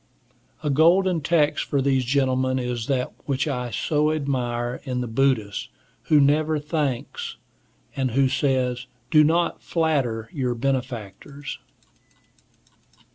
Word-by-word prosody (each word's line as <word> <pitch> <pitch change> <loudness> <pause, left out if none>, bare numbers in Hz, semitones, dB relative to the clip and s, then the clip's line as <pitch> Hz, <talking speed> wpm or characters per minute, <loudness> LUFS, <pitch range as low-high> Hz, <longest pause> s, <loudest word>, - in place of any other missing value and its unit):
A 150 - 0
golden 170 +4 +4
text 150 -1 +2
for 140 - 0
these 135 -1 +2
gentlemen 130 0 +1
is 125 -3 -3
that 130 -2 -1
which 140 +1 0
I 125 -4 -2
so 150 +8 +1
admire 125 -5 -2
in 125 -2 -2
the - - -2
Buddhist, 115 -4 0 0.4
who 150 - +5
never 150 +2 +3
thanks, 150 - -3 0.6
and 130 -2 0
who 135 +3 +3
says, 130 -2 0 0.2
"Do 155 -1 +7
not 170 +3 +1
flatter 135 -10 0
your 125 -4 -1
benefactors." 130 +1 -4
135 Hz, 120 wpm, -24 LUFS, 125-150 Hz, 0.6 s, Do